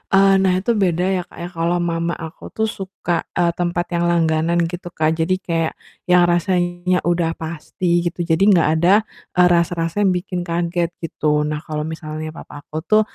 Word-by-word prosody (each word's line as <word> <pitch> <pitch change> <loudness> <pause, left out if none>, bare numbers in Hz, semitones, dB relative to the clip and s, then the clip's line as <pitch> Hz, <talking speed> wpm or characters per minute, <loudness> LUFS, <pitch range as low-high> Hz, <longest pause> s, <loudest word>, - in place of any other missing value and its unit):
eee, 195 0 +6
nah 190 -1 +3
itu 235 - +1
beda 175 0 +1
ya, 180 - 0
Kak, - - -17
ya - - -4
kalau 170 +1 0
mama 170 0 -1
aku 160 0 -9
tuh 220 - 0
suka, 190 -2 -5 0.2
eee, 175 -1 +2
tempat 175 0 0
yang 175 0 +1
langganan 170 0 +2
gitu, 175 +2 -5
Kak. 155 0 +2
Jadi 180 +3 +2
kayak 165 -2 -1 0.3
yang 180 0 +5
rasanya 175 +1 +1
udah 170 -1 0
pasti 170 +2 -2
gitu. 175 0 -3
Jadi 170 +4 +2
nggak 165 - +3
ada, 195 +5 +5 0.3
eee, 180 0 +6
rasa-rasa 170 +1 +1
yang 190 -3 +3
bikin 180 0 -3
kaget 170 0 0 0.2
gitu. 150 -2 0
Nah 150 0 -2
kalau 150 -1 -3
misalnya 155 0 -5
papa 145 -2 -11
aku 150 - -14
tuh, 215 0 +5
170 Hz, 185 wpm, -20 LUFS, 165-180 Hz, 0.3 s, eee